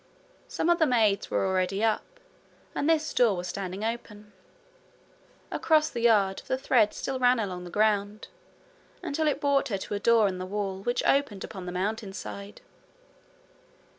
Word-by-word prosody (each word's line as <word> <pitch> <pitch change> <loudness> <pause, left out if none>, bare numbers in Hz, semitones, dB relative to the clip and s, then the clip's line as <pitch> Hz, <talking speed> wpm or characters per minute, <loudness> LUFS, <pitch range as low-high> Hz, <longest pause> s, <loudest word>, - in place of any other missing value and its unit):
Some - - -2
of 345 - +2
the 320 - +4
maids 220 -6 +2
were - - 0
already 190 +2 0
up, 225 - -1 0.5
and 290 - 0
this 315 -1 +1
door 225 -6 +3
was 175 0 -4
standing 190 +2 -5
open. 210 -2 -5 1.2
Across 310 -1 +2
the 235 - -4
yard 205 -5 +3
the 260 - 0
thread 235 -5 +2
still 265 -1 -3
ran 250 0 +4
along 180 -4 -4
the - - -8
ground, 210 +1 0 0.8
until 315 -1 -1
it 295 - +1
brought 280 -1 +2
her 205 -6 -2
to 190 - -6
a 200 - -1
door 225 -1 +4
in 185 -2 -3
the 185 - -4
wall 195 -1 -3
which 240 +4 -1
opened 275 -9 +1
upon 190 -4 -8
the - - -3
Mountainside. 200 - -5
215 Hz, 165 wpm, -27 LUFS, 195-255 Hz, 1.2 s, the